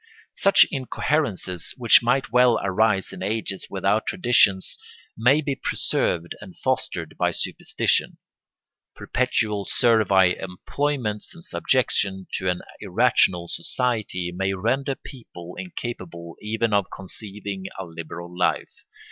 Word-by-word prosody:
Such 195 - +6
incoherences, 130 - -2
which 120 -3 +6
might 125 +1 +1
well 125 -1 +5
arise 100 0 +1
in - - -9
ages 100 0 -2
without 100 +3 0
traditions, 120 - +3 0.4
may 130 +7 +4
be 140 -2 -2
preserved 85 -8 0
and 95 -4 -12
fostered - - -2
by - - +3
superstition. - - -1 0.8
Perpetual 110 -5 0
servile 100 -6 +4
employments 110 - -3
and 170 - -13
subjection 100 - 0
to 95 - -1
an 90 - -1 0.2
irrational 85 -2 +2
society 105 -3 -2
may 95 +1 0
render 135 +8 0
people 90 - -11
incapable 95 - -7
even 110 +1 -1
of 100 -2 +2
conceiving 100 0 -6
a 95 - -5
liberal 85 +1 -8
life. 90 - 0
105 Hz, 115 wpm, -24 LUFS, 95-125 Hz, 0.8 s, Such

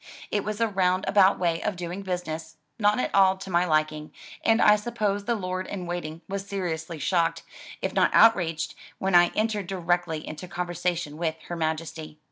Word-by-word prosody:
It 205 -1 0
was 215 +1 -4
a 230 - +3
round 185 -1 +1
about 200 -1 +5
way 170 -2 0
of 210 - -1
doing 175 +2 -5
business, 165 -4 -5 0.2
not 210 +2 +3
at - - -1
all 190 -1 +5
to 190 0 -8
my 175 +1 +3
liking, 155 -1 0 0.3
and 225 0 +4
I 210 -2 +7
suppose 210 -2 -2
the 235 +1 +1
Lord 185 -2 -3
in 185 -3 -5
Waiting 170 -2 -5
was 195 0 -4
seriously 170 -4 -3
shocked, 165 +1 0 0.4
if - - -1
not - - +4
outraged, 165 -8 +4 0.2
when 190 0 -1
I 175 0 +7
entered 215 -3 0
directly 175 -3 -1
into 155 +4 -7
conversation 175 -3 -3
with 160 -1 -1
Her 175 - -3
Majesty. 160 -1 -4
180 Hz, 180 wpm, -26 LUFS, 165-200 Hz, 0.4 s, I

